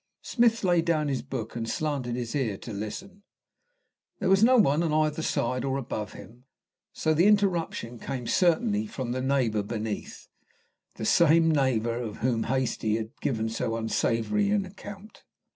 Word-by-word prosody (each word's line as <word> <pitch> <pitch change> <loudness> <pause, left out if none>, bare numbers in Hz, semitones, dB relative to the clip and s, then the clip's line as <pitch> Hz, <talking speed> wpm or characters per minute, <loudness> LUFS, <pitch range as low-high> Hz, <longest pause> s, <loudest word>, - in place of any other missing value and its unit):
Smith 235 -2 +2
laid 175 -3 +3
down 155 -3 +1
his 135 -2 -1
book 130 -5 -6
and 115 -1 -3
slanted 140 -5 -2
his 120 -2 -4
ear 120 -9 -1
to 115 - -8
listen. 185 - -6 1.0
There 190 -2 0
was 195 +2 +5
no 255 +2 +6
one 155 - +4
on 165 -2 0
either 155 0 +1
side 130 -5 -1
or 135 0 -1
above 110 -5 -4
him, 120 +3 -13 0.5
so - - -2
that 155 - +1
the 175 +5 +5
interruption 175 - +1
came 125 -3 -5
certainly 205 - +2
from 130 - -4
the 130 +1 -2
neighbour 130 -6 +1
beneath 110 0 -5 0.7
the 110 - -5
same 165 +4 +5
neighbour 120 -5 +1
of 110 -3 -5
whom 115 -2 0
Hastie 120 -4 0
had 110 0 -5
given 110 -4 -1
so 115 0 -2
unsavoury 115 - 0
an 205 -1 +1
account. 205 +2 -11
135 Hz, 165 wpm, -27 LUFS, 115-175 Hz, 1.0 s, no